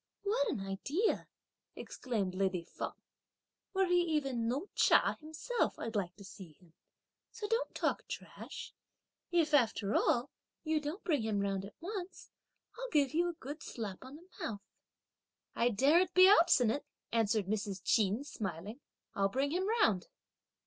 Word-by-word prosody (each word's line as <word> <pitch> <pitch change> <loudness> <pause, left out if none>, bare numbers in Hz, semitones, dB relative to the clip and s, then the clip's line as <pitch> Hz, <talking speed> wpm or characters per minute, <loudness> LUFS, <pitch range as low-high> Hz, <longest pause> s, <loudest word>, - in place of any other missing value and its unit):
"What 460 +4 +1
an 225 - -2
idea!" 280 - -1 0.5
exclaimed 210 -8 -3
lady 185 -2 0
Feng. - - -5 0.8
"Were 385 -1 +2
he 355 -1 +3
even 275 -8 0
No 275 +11 -1
Cha - - +4
himself, 315 +10 -2
I'd 225 0 -5
like 185 -4 -1
to 200 - -13
see 190 -3 -11
him; 170 +1 -24 0.6
so 415 - -5
don't 455 +3 -1
talk - - -1
trash; - - -8 0.6
if, 330 -3 +2
after 225 -6 +3
all, 245 +3 +2 0.3
you 315 -1 +1
don't 300 +7 -5
bring 300 -7 +1
him 220 -2 0
round 195 -1 -1
at 200 - -12
once, 375 +1 -6 0.5
I'll - - -4
give 290 - +2
you 345 +2 +2
a - - -4
good 300 -1 -8
slap 215 -8 -6
on 260 +2 -10
the 340 +4 -15 0.2
mouth." 205 -3 -3 0.9
"I 235 - +3
daren't 305 - +3
be 370 0 +9
obstinate," 290 - +5 0.3
answered 220 -2 +2
Mrs. 200 -1 -3
Ch'in 215 +3 +2
smiling; 205 - -5 0.3
"I'll 195 0 +1
bring 275 +6 0
him 370 +4 0 0.2
round!" 190 -5 +2
260 Hz, 150 wpm, -34 LUFS, 200-340 Hz, 0.9 s, be